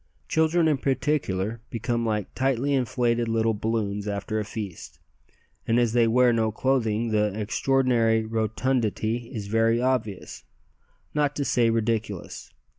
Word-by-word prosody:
Children 160 +1 +2
in 150 -3 +2
particular 115 -7 -1
become 115 0 -2
like 105 -3 -2
tightly 135 +1 0
inflated 120 -2 +1
little 115 0 +1
balloons 105 -1 -2
after 105 +2 -2
a - - -1
feast, 105 -4 -7 0.7
and 115 +1 +3
as 120 -2 +1
they 120 -1 +4
wear 125 +1 +4
no 110 -1 +1
clothing, 115 -2 0
the 105 -1 0
extraordinary 115 0 +2
rotundity 115 +1 -1
is 110 -6 -5
very 115 +2 +2
obvious, 120 -6 -2 0.7
not 145 -1 +1
to 140 - -2
say 120 -3 +2
ridiculous. 110 -4 -2
115 Hz, 130 wpm, -25 LUFS, 110-125 Hz, 0.7 s, they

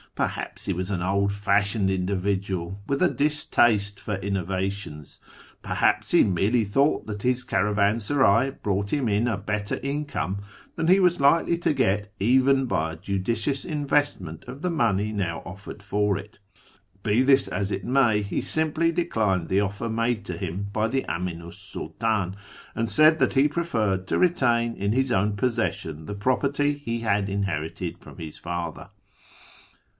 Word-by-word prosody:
Perhaps - - -3
he - - 0
was 90 +2 -3
an 95 -3 -2
old 100 +2 +1
fashioned 100 0 +1
individual, 95 0 -2
with 140 +3 -1
a 180 - +5
distaste 115 -9 +1
for 105 0 -3
innova 95 -1 -1
tions; 75 -8 -10 0.4
perhaps - - +1
he - - +6
merely 105 +5 +2
thought 135 +9 +1
that 105 -2 -6
his 125 +1 +1
caravansaray 105 +5 +2
brought 100 0 0
liim 130 +1 0
in 105 +4 +1
a 115 -4 0
better 105 0 -2
income 140 -8 -2 0.4
than 165 - -1
he 185 +3 +6
was 180 -2 +3
likely 165 +4 +4
to 170 - +1
get 105 -6 0
even 130 +5 +4
by 80 -9 -1
a - - -9
judicious 110 - -1
investment 145 - -1
of 135 +5 -9
the 180 - +1
money 110 - +1
now 95 -5 -2
offered 100 +3 -9
for 105 0 +1
it. 100 0 -11 0.6
Be 110 +2 +3
this 135 0 +4
as 100 0 -2
it - - -3
may, 120 -5 +3
he 100 - -2
simply 160 +1 +1
declined 110 - 0
the 95 +2 +3
offer 100 +3 -2
made 115 0 -1
to - - -5
him 95 +1 -4
by 110 +1 +1
the 135 +3 -1
Aminu 85 -1 -4
's - - -13
Sultdn, 105 -5 -1 0.4
and 115 0 -1
said 155 +1 +5
that - - +2
he 140 +1 +4
j^referred 110 - -1
to - - 0
retain 120 -10 +2
in 100 +1 -1
his 130 +1 +1
own 105 -1 +1
possession 100 -9 -2
the 105 - -5
property 140 +6 +1
he 115 -5 -4
had 105 -3 0
inherited 95 -6 -3
from - - -14
his 80 -2 -8
father. 85 0 -5
105 Hz, 160 wpm, -25 LUFS, 95-130 Hz, 0.6 s, he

